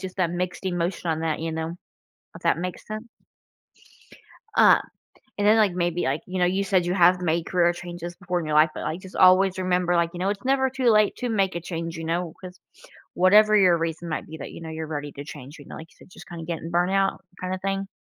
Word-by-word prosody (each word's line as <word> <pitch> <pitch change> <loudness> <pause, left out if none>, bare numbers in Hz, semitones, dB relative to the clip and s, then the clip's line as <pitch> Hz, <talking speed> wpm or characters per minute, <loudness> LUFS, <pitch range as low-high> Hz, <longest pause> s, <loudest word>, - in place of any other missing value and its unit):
just 185 -1 -7
that 180 -3 +1
mixed 180 +1 -4
emotion 175 -1 -2
on 160 0 -1
that, 160 -2 -1
you 165 0 -3
know? 160 +1 -4 0.6
If - - -13
that - - +2
makes 180 0 -5
sense. 215 +2 -6 1.5
Uh, - - +6 0.6
and 205 - +1
then, 215 +2 +6
like, 210 -4 +3
maybe, 175 -1 -1
like, 135 +3 -1
you 185 +1 -4
know, 180 - +4
you 190 +2 +1
said 185 -2 +1
you 175 - 0
have 180 0 +5
made 165 -1 0
career 175 -1 +2
changes 175 0 -7
before 180 -1 -2
in 165 - -5
your 155 - -3
life, 155 +1 +6
but, - - -5
like, 165 - -3
just 190 0 -12
always 185 +1 +5
remember, 180 -1 +1
like, 170 0 +1
you 175 - -7
know, 190 +2 0
it's 200 +1 -4
never 265 0 +2
too 255 -1 +1
late 215 -1 +3
to 250 - -3
make 195 -5 0
a - - -1
change, 165 -1 -5
you 165 - -6
know? 170 0 -2
'Cause 180 -1 -11 0.5
whatever 210 +4 +5
your 180 -4 +5
reason 165 +1 -4
might 155 - -3
be 160 0 -9
that, - - -8
you - - -10
know, 160 - -7
you're 160 0 -5
ready 145 -2 -5
to 140 - -8
change, 145 +1 -10
you 145 - -12
know, - - -10
like 160 - -9
you - - -24
said, - - -18
just - - -14
kinda 170 -1 -8
getting 165 0 -5
burnt 175 +2 +1
out, 195 0 0 0.2
kinda 185 0 -3
thing. 195 0 -2
175 Hz, 245 wpm, -24 LUFS, 165-190 Hz, 1.5 s, Uh